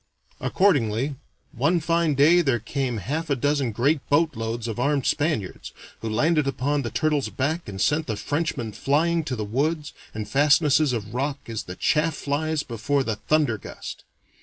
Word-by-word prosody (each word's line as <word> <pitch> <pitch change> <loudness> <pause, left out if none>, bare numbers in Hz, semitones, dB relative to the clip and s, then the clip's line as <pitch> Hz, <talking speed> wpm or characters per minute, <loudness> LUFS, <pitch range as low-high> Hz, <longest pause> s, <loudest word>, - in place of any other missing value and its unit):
Accordingly, 140 - +2 0.4
one 160 +9 +1
fine 165 -1 +1
day 160 +6 +6
there 135 -7 +2
came 125 +2 -2
half 150 - -3
a 140 - +2
dozen 140 -1 0
great 140 +8 +2
boatloads 120 -7 0
of 115 0 -4
armed 140 0 +1
Spaniards, 145 - -1 0.3
who 115 - -4
landed 150 +6 +2
upon 135 +2 0
the 120 - -3
Turtle's 150 -1 0
Back 155 +1 -2
and 95 -1 -7
sent 150 +8 +1
the 110 -3 -2
Frenchmen 140 -2 -2
flying 160 +8 +1
to 130 - -2
the 110 -2 -3
woods 150 +7 -1 0.2
and 105 -1 -4
fastnesses 145 +3 +4
of 110 -3 -4
rocks 135 -1 -3
as 110 - -3
the 90 - -7
chaff 155 +6 +1
flies 150 +2 -1
before 135 +4 -1
the 110 -4 -2
thunder 145 -5 +1
gust. - - -8
140 Hz, 165 wpm, -24 LUFS, 115-155 Hz, 0.4 s, day